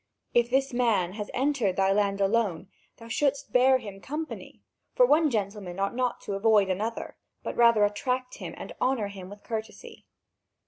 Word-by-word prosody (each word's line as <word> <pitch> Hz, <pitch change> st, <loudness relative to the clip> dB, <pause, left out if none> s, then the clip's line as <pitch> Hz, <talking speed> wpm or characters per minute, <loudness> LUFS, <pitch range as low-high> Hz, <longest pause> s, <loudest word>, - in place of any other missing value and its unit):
If 240 Hz, 0 st, +3 dB
this 270 Hz, +1 st, +1 dB
man 220 Hz, -8 st, +1 dB
has 210 Hz, 0 st, -6 dB
entered 255 Hz, -8 st, 0 dB
thy 195 Hz, 0 st, +2 dB
land 200 Hz, -1 st, +1 dB
alone, 195 Hz, -3 st, 0 dB, 0.3 s
thou 230 Hz, -, -12 dB
shouldst 280 Hz, +4 st, -1 dB
bear 260 Hz, +1 st, +5 dB
him 200 Hz, -5 st, -9 dB
company, 310 Hz, +3 st, -7 dB, 0.3 s
for -, -, +6 dB
one 315 Hz, -7 st, +4 dB
gentleman 200 Hz, -5 st, -3 dB
ought 195 Hz, 0 st, 0 dB
not 250 Hz, -1 st, -1 dB
to 200 Hz, -, -5 dB
avoid 200 Hz, -1 st, +3 dB
another, 215 Hz, +5 st, -4 dB, 0.3 s
but -, -, -4 dB
rather 235 Hz, -3 st, +5 dB
attract 250 Hz, +5 st, -2 dB
him -, -, -7 dB
and -, -, -8 dB
honour 250 Hz, -6 st, +1 dB
him 190 Hz, -2 st, -9 dB
with 205 Hz, +1 st, -12 dB
courtesy. 220 Hz, -2 st, -7 dB
225 Hz, 170 wpm, -27 LUFS, 200-255 Hz, 0.3 s, for